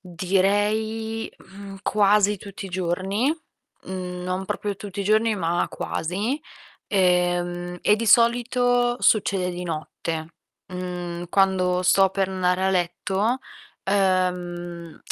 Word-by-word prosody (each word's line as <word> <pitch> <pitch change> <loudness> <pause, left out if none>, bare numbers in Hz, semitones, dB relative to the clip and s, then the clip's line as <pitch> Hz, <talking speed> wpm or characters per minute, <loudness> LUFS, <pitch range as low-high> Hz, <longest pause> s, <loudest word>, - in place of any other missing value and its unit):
direi, 205 +5 0
mhmm, 195 0 -11
quasi 205 0 +3
tutti 195 0 -8
i - - -8
giorni. 185 +6 -1 0.6
Mhmm, 180 -1 -5
non 185 +1 -2
proprio 205 +1 -3
tutti 200 0 -6
i - - -2
giorni 215 +2 +3
ma 175 -2 0
quasi. 205 - -2 0.5
Ehm, 175 -2 +1
e 210 - +4
di 230 +1 -3
solito 245 +2 +3
succede 195 -4 +3
di 175 0 -5
notte, 160 0 -4 0.4
mhmm, 180 -1 -5
quando 185 -1 +2
sto 195 +1 +5
per 190 0 0
andare 185 0 +1
a 190 - +3
letto, 190 +6 0 0.4
ehm, 180 -3 -1
190 Hz, 115 wpm, -24 LUFS, 180-205 Hz, 0.6 s, sto